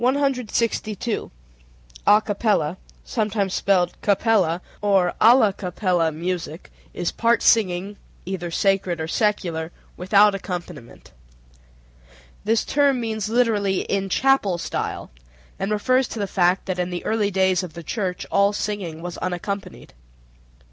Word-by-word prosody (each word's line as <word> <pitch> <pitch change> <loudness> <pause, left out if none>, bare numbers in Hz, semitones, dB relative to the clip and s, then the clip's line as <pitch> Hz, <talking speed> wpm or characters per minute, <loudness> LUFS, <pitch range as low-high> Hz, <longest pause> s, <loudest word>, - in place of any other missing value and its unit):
A 265 -2 +1 1.8
capella 205 -6 0 0.3
(sometimes 210 -4 -1
spelled 180 -3 +1
cappella) 200 -5 +2 0.2
or 195 -4 +2
alla 225 -3 +6
capella 180 -3 0
music 170 0 -5 0.2
is 175 - -2
part 230 0 +1
singing 200 -2 +2 0.3
(either 180 -2 -4
sacred 190 -1 0
or 160 - -3
secular) 175 -5 -1 0.3
without 200 +3 +4
accompaniment. 175 -9 -7 1.3
This 225 +1 +1
term 280 -2 +2
means 220 -3 -3
literally 215 -5 +1
"in 195 -1 -2
chapel 255 -6 +2
style," 165 -2 -4 0.5
and 195 - -2
refers 255 +5 +2
to - - -8
the 205 - -1
fact 180 -1 +1
that 185 -1 -3
in 180 0 -1
the 175 -1 -5
early 215 -2 +1
days 190 -1 +2
of 180 -4 -8
the 170 - -9
church 185 0 -3
all 200 +1 +3
singing 190 -6 -4
was 175 -1 -6
unaccompanied. 185 - -5
195 Hz, 120 wpm, -22 LUFS, 180-215 Hz, 1.8 s, alla